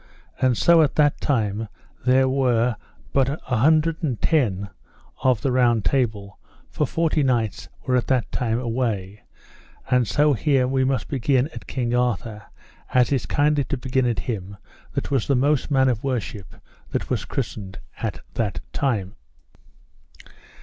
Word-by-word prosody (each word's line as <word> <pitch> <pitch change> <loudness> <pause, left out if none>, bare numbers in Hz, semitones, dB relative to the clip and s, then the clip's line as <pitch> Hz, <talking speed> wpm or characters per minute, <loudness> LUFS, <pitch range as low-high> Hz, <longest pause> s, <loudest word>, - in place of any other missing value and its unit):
And 130 -3 +3
so 170 -1 +5
at 150 - +1
that 145 -2 +2
time 110 -5 0 0.4
there 130 +1 +5
were 125 -3 +2 0.4
but 135 -1 +3
an 145 - -3
hundred 155 +6 +2
and 135 -9 -2
ten 100 - +1 0.5
of 130 -5 +2
the 135 - 0
Round 120 -5 +2
Table, 105 -4 -1 0.3
for - - 0
forty 165 -2 +1
knights 120 -6 0 0.2
were 125 -1 +2
that 130 -1 -1
time 115 -2 0
away; 115 -5 -2 0.7
and 125 -2 +3
so 150 +4 +3
here 130 +1 +2
we 130 0 +1
must 130 0 0
begin 135 0 +1
at - - -9
King 120 -3 -2
Arthur, 115 -3 -1 0.4
as 125 +1 +3
is 135 -3 0
kindly 145 0 +2
to 140 - -3
begin 130 0 0
at 120 - -1
him 100 -4 -5 0.4
that - - -3
was 135 -5 +1
the 140 - +3
most 140 +3 +1
man 135 -2 +3
of 120 -3 0
worship 115 -7 -4 0.3
that - - -3
was - - 0
christened 95 -2 -5 0.2
at - - -3
that 100 -8 -2
time. 110 -9 -1
125 Hz, 150 wpm, -23 LUFS, 115-135 Hz, 0.7 s, so